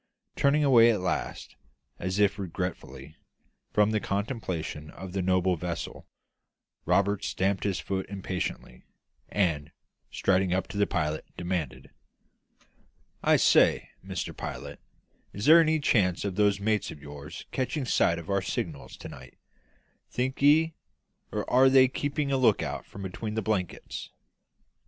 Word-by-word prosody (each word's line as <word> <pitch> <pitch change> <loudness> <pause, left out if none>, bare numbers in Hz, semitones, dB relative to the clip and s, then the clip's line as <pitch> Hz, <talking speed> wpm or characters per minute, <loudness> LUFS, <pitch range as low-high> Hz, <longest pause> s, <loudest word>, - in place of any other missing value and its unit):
Turning 145 +2 +3
away 120 -5 +7
at 110 -4 +2
last, 90 0 -3 0.4
as 95 +2 -2
if 100 0 +2
regretfully, 80 -6 -5 0.6
from 105 0 +3
the 110 - +1
contemplation 100 - -3
of 95 -1 -9
the 95 - -1
noble 90 0 +2
vessel, 85 0 -5 0.8
Roberts 100 0 +2
stamped 95 +1 0
his 100 -3 0
foot 95 -1 -3
impatiently, 95 -2 -5 0.5
and, 80 -7 0 0.4
striding 95 -1 +1
up 95 0 -1
to 100 - -6
the 100 - +3
pilot, 75 -3 -1
demanded 90 -6 -4 1.3
"I - - +4
say, - - +4
Mr - - -5
Pilot, - - -7 0.5
is 100 +3 -4
there 165 +2 +9
any 160 -1 +2
chance 100 - +2
of 100 - -2
those 100 0 +2
mates 105 0 0
of 75 - -9
yours 70 0 -9
catching 130 +2 -2
sight 85 -7 +2
of 85 - -8
our 100 -1 +1
signals 80 -5 -4
to - - -9
night, 65 -1 -12 0.7
think 130 +2 -2
ye, 160 +3 +5 0.6
or - - -3
are 130 +2 +5
they 130 0 +6
keeping 145 +2 -2
a 135 - +2
lookout 115 -5 +1
from 100 - -9
between 105 +3 -5
the 110 - -1
blankets?" 95 -4 -3
100 Hz, 140 wpm, -28 LUFS, 90-115 Hz, 1.3 s, there